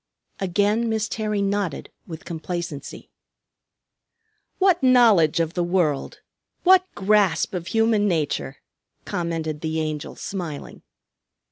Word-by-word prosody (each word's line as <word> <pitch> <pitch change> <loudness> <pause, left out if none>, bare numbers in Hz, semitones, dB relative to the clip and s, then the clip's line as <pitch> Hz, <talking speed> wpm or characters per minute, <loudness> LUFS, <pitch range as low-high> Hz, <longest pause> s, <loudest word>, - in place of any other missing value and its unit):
Again 205 +5 +1
Miss 220 -1 0
Terry 215 -2 -2
nodded 200 -6 -2 0.2
with 165 +2 -9
complacency. 170 -3 -6 1.5
"What 375 -3 +3
knowledge 230 - +5
of 165 0 0
the 175 - 0
world! 170 -6 -1 0.4
What 370 0 +5
grasp 200 -4 +2
of 175 -2 -4
human 225 0 +2
nature!" 150 -5 -1 0.5
commented 165 -3 -3
the 160 0 -2
Angel, 155 -2 -4
smiling. 170 -7 -6
180 Hz, 105 wpm, -23 LUFS, 160-215 Hz, 1.5 s, knowledge